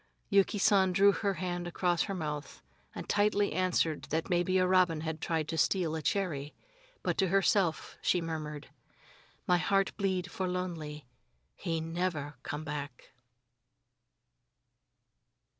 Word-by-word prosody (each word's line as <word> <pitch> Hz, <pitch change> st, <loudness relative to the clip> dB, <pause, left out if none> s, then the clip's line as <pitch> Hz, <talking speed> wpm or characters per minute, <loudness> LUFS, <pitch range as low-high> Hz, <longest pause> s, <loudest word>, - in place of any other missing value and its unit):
Yuki 200 Hz, +2 st, +4 dB
San 195 Hz, -2 st, +4 dB
drew 200 Hz, +2 st, +6 dB
her 200 Hz, -1 st, -1 dB
hand 175 Hz, 0 st, -3 dB
across 175 Hz, 0 st, +1 dB
her 195 Hz, -, -1 dB
mouth, 150 Hz, -, -5 dB, 0.3 s
and -, -, -5 dB
lightly 205 Hz, 0 st, +2 dB
answered 180 Hz, -4 st, +1 dB
that 160 Hz, +4 st, -2 dB
maybe 175 Hz, +1 st, +2 dB
a 185 Hz, -, +4 dB
robin 180 Hz, -4 st, +3 dB
had 160 Hz, 0 st, -4 dB
tried 160 Hz, -2 st, -1 dB
to 160 Hz, 0 st, -2 dB
steal 175 Hz, -3 st, +2 dB
a 160 Hz, -, -3 dB
cherry. 150 Hz, -6 st, -1 dB, 0.5 s
But -, -, -1 dB
to 190 Hz, -, +4 dB
herself 190 Hz, -2 st, +1 dB
she 180 Hz, -, +2 dB
murmured: 155 Hz, -3 st, -5 dB, 0.8 s
"My 180 Hz, -1 st, +3 dB
heart 195 Hz, +2 st, +1 dB
bleed 190 Hz, -2 st, -1 dB
for 185 Hz, -, -2 dB
lonely. 165 Hz, -5 st, -4 dB, 0.5 s
He 165 Hz, -3 st, -2 dB
never 165 Hz, -3 st, -2 dB
come 150 Hz, +3 st, -5 dB
back." 145 Hz, -4 st, -6 dB
175 Hz, 135 wpm, -31 LUFS, 155-190 Hz, 0.8 s, drew